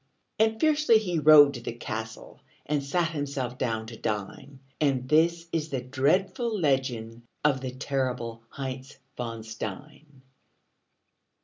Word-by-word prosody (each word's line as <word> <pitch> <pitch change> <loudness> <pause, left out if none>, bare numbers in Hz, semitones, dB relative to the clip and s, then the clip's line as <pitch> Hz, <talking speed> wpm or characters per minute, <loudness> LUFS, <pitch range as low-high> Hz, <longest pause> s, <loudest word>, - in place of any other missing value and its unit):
And 220 0 +2
fiercely 305 -6 +4
he 180 -6 -1
rode 150 -2 +8
to 120 - -7
the 115 - -5
castle 110 -1 -7 0.2
And 145 -1 -1
sat 165 +4 0
himself 140 -5 -4
down 110 -3 -1
to 115 +1 -9
dine; 110 +7 -5 0.2
And 135 -4 +1
this 165 +3 +3
is 160 -1 -2
the 135 - -2
dreadful 185 - 0
legend 125 -6 -1 0.2
Of 135 -3 +3
the 130 - -3
terrible 125 -3 -3
Heinz 135 0 -6 0.2
von 115 -2 -5
Stein. 130 +6 -8
135 Hz, 130 wpm, -27 LUFS, 120-155 Hz, 0.2 s, rode